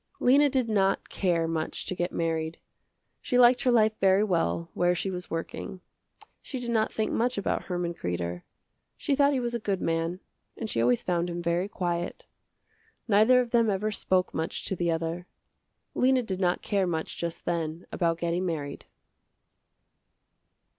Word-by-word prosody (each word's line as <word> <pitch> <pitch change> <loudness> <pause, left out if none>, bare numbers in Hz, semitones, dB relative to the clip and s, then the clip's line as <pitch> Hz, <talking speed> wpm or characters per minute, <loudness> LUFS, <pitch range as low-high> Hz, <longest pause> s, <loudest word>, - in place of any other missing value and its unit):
Lena 285 +3 +5
did 260 -3 0
not 195 -3 +1
care 170 -4 0
much 160 -1 -3
to - - -3
get 175 0 -2
married. 160 -1 -2 0.6
She 250 - 0
liked 245 0 +6
her 255 - +3
life 220 -2 +4
very 195 +1 +4
well 170 -3 0
where 175 0 +2
she 190 +2 -2
was 180 -1 -6
working. 165 +3 -5 0.6
She 265 - -6
did 240 -1 -3
not 220 -1 +1
think 220 - -1
much 245 +1 0
about 200 - -1
Herman 175 -1 -2
Kreder. 90 - -3 0.6
She 285 - -1
thought 280 +1 +4
he 270 - +1
was 240 -1 -2
a 235 - -1
good 200 -3 -1
man 165 +2 -1 0.4
and 225 - -4
she 115 - 0
always 120 +1 +2
found 175 -1 0
him 170 0 -4
very 170 +2 0
quiet. 175 -3 -3 0.8
Neither 225 +4 +5
of 240 -2 -5
them 230 -2 +3
ever 205 +2 0
spoke 185 -3 +1
much 160 0 -3
to 190 - -1
the 175 -1 -1
other. 165 +2 -2 0.7
Lena 255 0 +3
did 190 -4 -4
not 180 -2 +1
care 195 -3 +1
much 160 -2 -3
just 170 -1 -4
then 165 -1 -2
about 165 -2 0
getting 170 +2 -1
married. 155 -5 -4
180 Hz, 170 wpm, -28 LUFS, 170-220 Hz, 0.8 s, liked